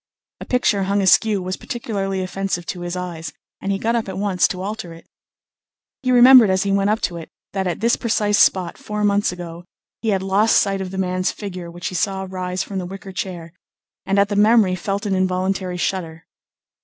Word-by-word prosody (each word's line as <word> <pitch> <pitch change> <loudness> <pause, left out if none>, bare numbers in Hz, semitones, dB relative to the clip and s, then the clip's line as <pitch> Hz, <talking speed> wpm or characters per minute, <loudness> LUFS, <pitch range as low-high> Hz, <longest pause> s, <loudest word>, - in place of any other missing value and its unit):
A - - -8
picture 210 -6 +1
hung 200 +1 +1
askew 200 +1 +4
was 185 +1 -3
particularly 195 -5 -3
offensive 185 -1 -3
to 180 - -5
his 175 0 -4
eyes, 165 -4 -5 0.3
and 195 - -2
he 195 - 0
got 230 +4 0
up 225 -4 -1
at 190 - -5
once 195 -3 +2
to 185 0 -5
alter 205 -4 -5
it. 165 - -16 1.0
He 255 -2 0
remembered 250 -2 +8
as 190 0 +2
he 200 - -1
went 195 +1 +2
up 215 +1 +1
to 175 - -2
it 165 - -9 0.2
that 190 -1 -1
at 175 +2 -3
this 235 +1 +3
precise 210 -3 +1
spot 180 -3 +3
four 210 0 -4
months 205 -1 +2
ago 175 -1 -8 0.4
he 225 - -1
had 195 -2 +1
lost 200 +3 +3
sight 195 -1 +1
of 190 - -4
the 190 - -7
man's 185 -1 0
figure 185 -4 -7
which 175 +1 -5
he - - -10
saw 190 +1 -1
rise 185 0 -3
from 195 -2 -5
the 180 - -5
wicker 195 +1 -9
chair, 175 -4 -6 0.5
and 195 +1 0
at 200 0 +3
the 205 - -2
memory 210 -2 +4
felt 195 +3 -3
an 200 - 0
involuntary 185 0 -1
shudder. 165 -3 -3
190 Hz, 210 wpm, -21 LUFS, 180-205 Hz, 1.0 s, remembered